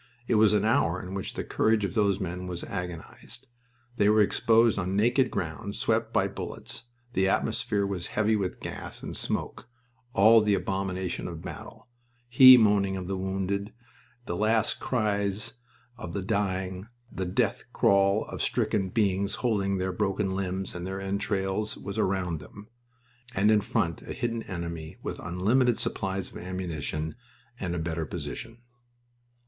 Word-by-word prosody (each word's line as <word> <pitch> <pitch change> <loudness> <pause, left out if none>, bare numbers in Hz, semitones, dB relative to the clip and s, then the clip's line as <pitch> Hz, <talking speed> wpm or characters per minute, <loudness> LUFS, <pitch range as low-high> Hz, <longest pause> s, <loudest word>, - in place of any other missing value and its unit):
It - - +1
was 110 -1 +5
an 105 0 +2
hour 95 -6 +2
in 90 +1 -7
which 95 -1 -4
the - - -2
courage 110 -2 +2
of 90 - -4
those 100 -2 +2
men 90 -1 -4
was 90 -1 -4
agonized. 90 +6 -7 0.5
They 105 - +4
were 105 0 +5
exposed 115 +1 +3
on 95 +1 -1
naked 120 +5 +3
ground 100 +5 -4
swept - - 0
by - - +2
bullets, 120 - -6 0.3
the 95 -3 +2
atmosphere 100 +1 0
was 95 -3 -3
heavy 110 +1 +1
with 95 -3 -2
gas - - -7
and - - -5
smoke; - - -3 0.5
all 110 +3 +7
the 105 -1 +3
abomination 95 -2 -2
of 85 -2 -7
battle - - -9 0.4
he 130 +1 +10
moaning 100 -4 +3
of 95 - -5
the 95 - -2
wounded, 95 +2 -2 0.5
the 85 - -3
last 110 +2 +2
cries 100 -4 -1 0.5
of 90 -8 -6
the 100 - -2
dying, 95 -1 -2 0.2
the 95 -1 -3
death 100 +3 0
crawl 100 -3 +3
of - - -6
stricken 95 -2 0
beings 100 -1 +1
holding 100 -4 +1
their 95 0 -1
broken 95 +1 0
limbs 95 0 -3
and 90 0 -5
their 95 +1 -4
entrails 100 +1 -2
was 100 - -5
around 90 -4 0
them, 100 +9 -13 0.7
and 105 +3 +4
in 105 -1 +4
front 85 -4 -1
a - - -7
hidden 115 -1 -2
enemy 85 -3 -5
with - - -4
unlimited 115 +8 +2
supplies 95 -1 -2
of - - -9
ammunition 80 -4 -4 0.5
and 90 -1 -2
a - - -2
better 80 -1 -2
position. 115 - -7
95 Hz, 155 wpm, -28 LUFS, 90-105 Hz, 0.7 s, he